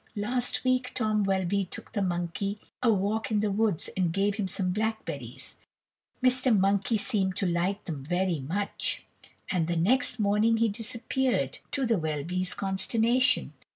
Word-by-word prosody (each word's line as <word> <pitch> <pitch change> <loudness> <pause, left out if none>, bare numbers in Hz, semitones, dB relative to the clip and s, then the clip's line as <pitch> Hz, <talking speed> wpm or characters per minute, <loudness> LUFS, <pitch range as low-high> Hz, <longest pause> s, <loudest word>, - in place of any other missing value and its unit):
Last 240 +4 0
week 255 0 0
Tom 215 -3 +1
Welby 195 0 +1
took - - -8
the 205 - 0
monkey 180 +2 -2 0.2
a 240 -2 +4
walk 210 +2 0
in 215 -2 +1
the 210 0 0
woods 205 -4 +1
and 180 -3 +1
gave 200 +3 +1
him 200 -1 -2
some 185 0 0
blackberries. 220 +3 -3 0.7
Mr. 255 -2 +4
Monkey 200 +3 +2
seemed 200 -4 +1
to 195 - 0
like 180 +4 0
them 150 -6 -5
very 175 +1 0
much, 185 +10 -1 0.5
and 175 -4 +1
the 170 0 -1
next 245 +8 +2
morning 210 +2 +3
be 225 0 +2
disappeared, 230 - -1
to 275 -2 0
the 225 -5 +2
Welbys' 160 +4 -2
consternation. 230 +6 +2
200 Hz, 155 wpm, -28 LUFS, 185-225 Hz, 0.7 s, a